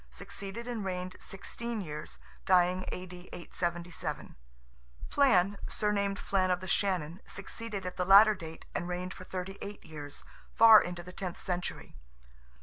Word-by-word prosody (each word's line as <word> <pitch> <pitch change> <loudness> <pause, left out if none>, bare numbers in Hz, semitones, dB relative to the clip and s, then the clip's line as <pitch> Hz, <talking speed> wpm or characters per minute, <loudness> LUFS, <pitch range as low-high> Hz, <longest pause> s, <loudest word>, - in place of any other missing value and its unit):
succeeded 200 +3 -6
and 235 -4 -3
reigned 185 -1 -3
sixteen 230 +3 -4
years 150 -6 -6 0.3
(dying 185 0 +4
A.D. 180 0 -8
877); 175 0 -4 0.8
Flan 200 -8 +4
(surnamed 200 -2 0
Flan 190 -2 +1
of 180 -1 +2
the 185 - -8
Shannon) 180 -3 0
succeeded 200 0 -5
at 180 - -5
the 180 - 0
latter 200 +3 +9
date, 160 -5 -9
and 175 - -2
reigned 180 +1 -3
for 185 - -10
thirty 190 +1 -5
eight 205 +1 -7
years, 145 -2 -8 0.3
far 225 -1 +10
into 175 -1 -5
the 180 +1 -10
tenth 185 -3 -4
century. 180 - -4
185 Hz, 145 wpm, -31 LUFS, 180-200 Hz, 0.8 s, far